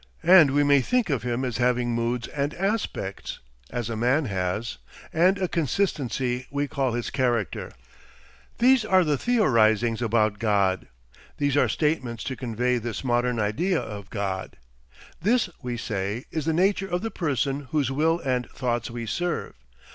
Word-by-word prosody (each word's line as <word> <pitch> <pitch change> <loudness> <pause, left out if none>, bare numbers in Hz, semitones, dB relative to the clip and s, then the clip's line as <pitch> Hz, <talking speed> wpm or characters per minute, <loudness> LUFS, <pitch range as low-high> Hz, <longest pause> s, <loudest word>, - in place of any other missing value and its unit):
And 175 -5 +8
we 145 - +4
may 145 -1 +5
think 240 - +1
of 135 -6 0
him 125 +2 -2
as 125 -3 -2
having 125 0 +1
moods 115 0 -1
and 145 +1 -2
aspects 195 - -3 0.3
as 120 -3 -3
a 115 - -3
man 125 +7 +2
has 95 - -2 0.3
and 180 +5 +4
a 190 -2 0
consistency 135 - -1
we 145 0 -1
call 135 -3 -1
his 120 0 -3
character. 120 -6 -1 0.9
These 255 0 +5
are 190 -3 +4
theorisings 120 - +2
about 110 -3 +1
God. 100 -4 +1 0.5
These 145 -2 +1
are 145 - +3
statements 130 -7 -1
to 130 - -3
convey 125 +1 -1
this 120 +2 -5
modern 120 -1 +1
idea 160 - +1
of 100 -2 -7
God. 95 -3 -4 0.6
This, 220 0 +2
we 125 -2 -4
say, 105 +1 -3
is 155 -3 -2
the 160 - +2
nature 195 +3 +2
of 175 +1 -2
the 225 - -2
person 140 -3 -1
whose 145 -5 0
will 160 +5 +2
and 125 -2 -1
thoughts 120 -2 -2
we 120 0 -5
serve. 175 +9 -2
125 Hz, 155 wpm, -25 LUFS, 115-160 Hz, 0.9 s, And